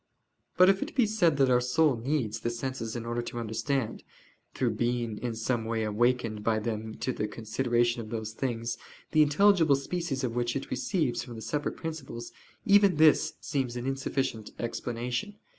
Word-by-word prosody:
But 185 - +8
if 195 0 +4
it - - -4
be 255 -4 +4
said 205 -9 +2
that 135 -2 +4
our 125 0 +4
soul 140 +3 +3
needs 120 -2 -1
the 120 - -1
senses 120 -1 -4
in 115 -1 -4
order 120 +1 -1
to 120 - -6
understand, 115 +2 -2 0.5
through 125 -3 +1
being 120 -1 -1
in 120 -2 -3
some 115 +1 -1
way 110 0 -1
awakened 115 0 +1
by 110 0 +2
them 110 0 -3
to 130 - 0
the 105 - -2
consideration 120 +2 0
of 110 - -9
those 110 -1 -4
things, 115 -1 -3 0.3
the 155 - +5
intelligible 160 0 +5
species 140 -1 -3
of 120 -3 -1
which 120 -1 0
it 135 - -4
receives 145 0 0
from 120 -3 -9
the 110 - -7
separate 150 0 -2
principles: 135 -7 -6 0.3
even 200 -3 +6
this 155 0 +5
seems 130 -4 -2
an 120 0 -4
insufficient 135 -4 -2
explanation. 120 - -3
120 Hz, 175 wpm, -29 LUFS, 115-145 Hz, 0.5 s, But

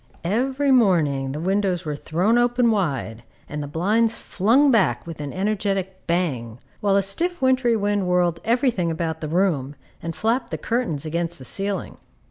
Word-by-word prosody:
Every 260 +9 +1
morning 160 - +3
the 145 - -4
windows 190 0 0
were 150 -1 -2
thrown 175 +9 0
wide - - +5 0.8
open, - - -20 0.2
and 150 0 -5
the 145 - -5
blinds 215 +9 +1
flung 250 +9 +3
back 225 -6 +2
with 165 -3 -7
an 145 -1 -5
energetic 195 -1 -2
bang, 135 -10 -1 0.2
while 200 -1 +2
a 200 - +3
stiff 345 - -1
wintry 255 -3 +3
wind 205 -2 0
whirled 175 -2 +2
every 245 +3 +2
thing 180 -6 -1
about 160 -1 -3
the 155 - -4
room, 155 -6 0 0.3
and 165 -1 -5
flapped 230 +4 0
the - - -3
curtains 225 - -2
against 170 +2 -2
the 130 - -10
ceiling. 195 +6 -3
190 Hz, 170 wpm, -23 LUFS, 160-225 Hz, 0.8 s, wide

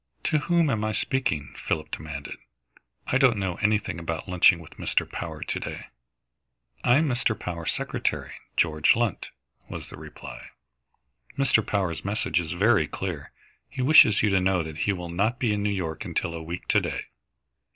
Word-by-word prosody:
"To 155 - +2
whom 170 -1 +2
am 110 -3 -1
I 110 0 0
speaking?" 130 - -1
Philip 80 - -2
demanded. 75 -2 -6 0.7
"I 135 - +1
don't 130 -6 +5
know 95 -3 -2
anything 105 -4 0
about 80 +1 -4
lunching 90 -1 +5
with 85 -2 -14
Mr. - - 0
Power - - -5
to - - -3
day." - - -7 0.9
"I 120 - +5
am 155 +1 +2
Mr. 120 -4 0
Power's 85 -2 -3
secretary, - - -2 0.3
George 75 -2 +4
Lunt," 115 -4 -1 0.4
was - - -7
the - - -10
reply. - - -10 0.9
"Mr. 135 -5 +3
Power's 95 -6 -1
message 100 -4 0
is 80 -1 -3
very 100 -3 +3
clear. 80 -1 -5 0.4
He 130 -2 -3
wishes 125 -8 +7
you 105 - +3
to 95 - +4
know 90 -2 +2
that 80 0 -8
he - - +5
will 90 -3 -5
not 105 +8 0
be 120 -5 +1
in 105 - -1
New 105 - +1
York 90 -6 -3
until 85 - -2
a 85 - -5
week 85 +3 -6
to - - +4
day." - - -3
95 Hz, 175 wpm, -26 LUFS, 85-115 Hz, 0.9 s, wishes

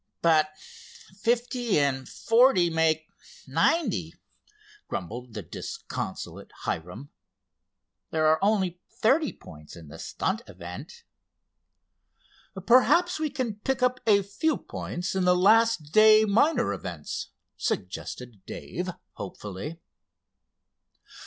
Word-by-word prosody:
"But 170 +3 +3
fifty 235 +2 -2
and 135 -2 0
forty 225 -7 +4
make 160 -1 +1 0.4
ninety," 165 - +1 0.7
grumbled 115 +6 -6
the 105 - -4
disconsolate - - -6
Hiram. 90 - -4 1.0
"There 155 -1 +1
are 155 +1 +4
only 190 -4 +1
thirty 290 +7 +2
points 75 -3 -13
in 80 -4 -12
the - - -11
stunt - - -2
event." 90 0 -9 1.6
"Perhaps 325 +9 +4
we 310 -1 0
can 255 -6 -3
pick 265 +3 -1
up 250 0 +2
a 200 -2 +5
few 205 +11 0
points 180 +2 -5
in 190 -1 0
the 180 0 +4
last 215 -5 +4
day 215 +1 +7
minor 240 +5 +3
events," 85 -5 -5 0.3
suggested 105 +3 -4
Dave, - - -5 0.3
hopefully. 105 - -7
180 Hz, 100 wpm, -27 LUFS, -, 1.6 s, day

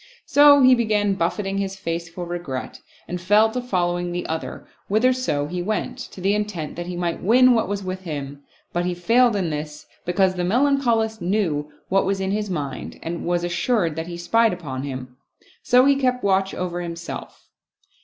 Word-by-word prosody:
So 285 -2 +7
he 255 0 +8
began 210 -4 +2
buffeting 195 +2 -1
his 195 -1 -2
face 170 -2 -4
for 175 +1 -6
regret, 170 -7 -5 0.3
and 180 0 -4
fell 210 +4 +4
to 250 +2 -2
following 175 -6 -1
the 175 0 -3
other 160 0 -5 0.2
whitherso 225 - +1
he 180 +3 -3
went, 210 +4 -3
to - - -9
the 195 +2 +1
intent 210 -7 -3
that 175 0 -5
he 180 - -4
might 175 -1 -2
win 250 +5 +5
what 225 -4 +1
was 200 0 -3
with 185 0 -4
him, 145 -5 -6 0.3
but 175 - 0
he 180 0 -1
failed 230 +6 +3
in 185 -5 -1
this, 150 0 -6 0.2
be 175 - 0
cause 190 0 +3
the 180 - -3
Melancholist 230 -1 +1
knew 170 -6 -1 0.2
what 195 +1 +2
was 195 0 0
in 190 0 -1
his 210 0 -2
mind 145 -7 -5
and 170 +1 -4
was 175 0 0
assured 175 -1 0
that 160 +1 -4
he 170 -1 -6
spied 225 +5 +2
upon 140 -7 -5
him; 130 -2 -7 0.4
so 250 0 +5
he 280 0 +5
kept 255 -2 0
watch 195 -1 +1
over 175 -1 -3
him 170 -1 -5
self. 170 0 -8
185 Hz, 195 wpm, -22 LUFS, 170-220 Hz, 0.4 s, he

